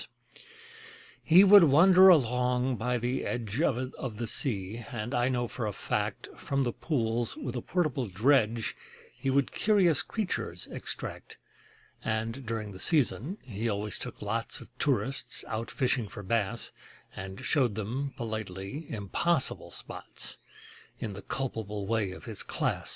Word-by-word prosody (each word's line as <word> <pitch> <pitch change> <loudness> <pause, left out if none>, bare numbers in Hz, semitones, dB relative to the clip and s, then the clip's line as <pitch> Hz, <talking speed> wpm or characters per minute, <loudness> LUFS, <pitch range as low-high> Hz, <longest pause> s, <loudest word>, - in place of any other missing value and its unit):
He 175 +4 +8
would 200 -2 +9
wander 180 +6 +8
along 125 -4 +3
by 125 +4 0
the 125 +3 -1
edge 115 +1 -2
Of 130 -5 -1
the 120 - -2
sea, 110 -2 -1
and 120 +1 -4
I 120 +1 +2
know 120 -2 0
for 115 -1 -3
a - - -1
fact 95 - -2
From 140 -1 -1
the 120 -2 -1
pools 120 - -1
with 300 - -4
a - - -2
portable 150 -9 0
dredge 115 +1 +2 0.4
He 135 - -3
would 135 0 +2
curious 190 -8 +3
creatures 215 -5 -3
extract: - - -5 0.7
And, 115 +3 -2
during 110 -2 -3
the 95 - -10
season, 150 - +1
he 115 -1 -3
always 105 -1 -2
took - - -5
lots - - -2
Of - - -14
tourists 125 -1 -1
out 115 +1 -3
fishing 125 -4 0
for 105 - -9
bass, 115 +2 0 0.4
And 95 +1 -7
showed 125 -8 +2
them 125 +6 -3
politely 110 - -5
impossible 130 - 0
spots, - - -5 0.6
In 105 - -4
the 100 - -8
culpable 105 -4 -3
way 110 -2 +1
of 95 - -10
his 110 -4 -5
class. - - -2
120 Hz, 145 wpm, -29 LUFS, 110-135 Hz, 0.7 s, would